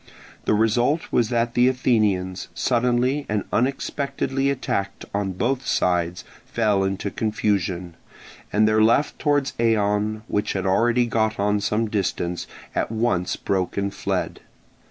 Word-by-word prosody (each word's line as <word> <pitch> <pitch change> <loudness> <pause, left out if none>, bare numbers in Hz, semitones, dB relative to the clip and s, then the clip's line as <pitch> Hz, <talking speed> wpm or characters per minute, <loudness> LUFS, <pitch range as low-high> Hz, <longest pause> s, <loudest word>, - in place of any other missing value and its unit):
The - - +3
result 120 +8 +2
was 115 -2 +2
that 120 -1 0
the 125 0 +4
Athenians, 105 -8 +1
suddenly 125 +3 +1
and 105 -1 0
unexpectedly 135 +1 0
attacked 100 -7 -2
on 100 -2 -1
both 125 +7 -1
sides, 90 -1 0 0.2
fell 105 -4 +1
into 95 +1 -2
confusion; 95 -5 -1 0.6
and 110 +1 +3
their 110 0 +3
left 115 +7 +3
towards 145 -2 +1
Eion, 110 -1 +1
which 105 0 -1
had 95 -1 -2
already 120 +5 +3
got 110 -2 0
on 105 +1 +2
some 105 +2 0
distance, 90 -4 -2 0.3
at - - -1
once 110 -6 0
broke 95 -1 -2
and 100 0 -1
fled. - - -2
110 Hz, 135 wpm, -23 LUFS, 100-120 Hz, 0.6 s, the